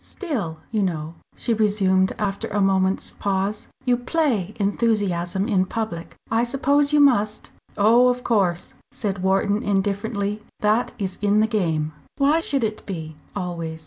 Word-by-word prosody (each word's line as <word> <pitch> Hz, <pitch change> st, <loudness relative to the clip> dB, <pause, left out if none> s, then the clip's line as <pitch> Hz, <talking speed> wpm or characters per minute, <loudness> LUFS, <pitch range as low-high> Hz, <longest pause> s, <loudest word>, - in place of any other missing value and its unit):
"Still, 230 Hz, -, -4 dB
you 215 Hz, -2 st, +1 dB
know," 160 Hz, -4 st, -2 dB, 0.2 s
she 235 Hz, -, 0 dB
resumed 200 Hz, -3 st, +2 dB
after 200 Hz, -1 st, -2 dB
a 210 Hz, -, -2 dB
moment's 190 Hz, -1 st, +2 dB
pause 200 Hz, +1 st, -2 dB, 0.2 s
"you 245 Hz, -1 st, +3 dB
play 245 Hz, -, 0 dB
enthusiasm 200 Hz, -3 st, 0 dB
in 185 Hz, -3 st, +2 dB
public 200 Hz, -7 st, -4 dB, 0.2 s
I 225 Hz, +1 st, +3 dB
suppose 280 Hz, +3 st, +2 dB
you 300 Hz, -, +4 dB
must." 215 Hz, -7 st, +2 dB, 0.3 s
"Oh! 230 Hz, +4 st, +5 dB
of 250 Hz, 0 st, 0 dB
course," 190 Hz, -7 st, 0 dB, 0.2 s
said 195 Hz, -3 st, -3 dB
Wharton, 195 Hz, +2 st, +2 dB
indifferently. 205 Hz, +1 st, -1 dB, 0.2 s
"That 215 Hz, +3 st, +2 dB
is 190 Hz, -3 st, -3 dB
in 205 Hz, 0 st, +3 dB
the 215 Hz, -, +4 dB
game." 165 Hz, -8 st, 0 dB, 0.3 s
"Why 285 Hz, +3 st, +3 dB
should 280 Hz, -6 st, -1 dB
it 215 Hz, -1 st, -2 dB
be 160 Hz, -5 st, -6 dB, 0.2 s
always? 170 Hz, -4 st, -4 dB
205 Hz, 145 wpm, -23 LUFS, 190-230 Hz, 0.3 s, Oh